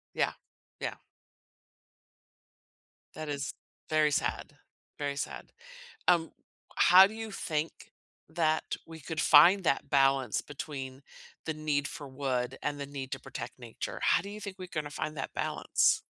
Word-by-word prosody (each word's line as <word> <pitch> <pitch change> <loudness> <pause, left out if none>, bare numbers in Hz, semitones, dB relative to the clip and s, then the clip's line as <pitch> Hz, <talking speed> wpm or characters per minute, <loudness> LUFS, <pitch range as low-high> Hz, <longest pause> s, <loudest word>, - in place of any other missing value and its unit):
Yeah. - - +2 0.5
Yeah. - - -2 2.2
That 155 -1 -6
is 145 -1 -3 0.4
very 155 -1 +4
sad, 140 - -1 0.4
very 145 -1 -2
sad. - - -5 0.6
Um, 170 -2 +4 0.4
how 185 +2 +9
do 215 - -7
you 225 -1 -5
think 160 -4 -2 0.6
that 160 -2 0
we 160 0 -10
could 160 +2 -3
find 175 +6 +7
that 135 - +1
balance 135 -4 +3
between 135 -2 -7 0.4
the 160 - -1
need 150 -2 0
for 145 -4 -7
wood 130 -1 -2
and 145 -1 -2
the 140 - -3
need 140 0 -7
to 135 - -3
protect - - -7
nature? 120 -2 -6
How - - +4
do 200 - -7
you 210 +1 -8
think 195 -2 -7
we're 185 -1 -7
gonna 150 -3 -3
find 155 +2 -4
that 135 - -5
balance? - - +2
150 Hz, 145 wpm, -30 LUFS, 135-165 Hz, 2.2 s, how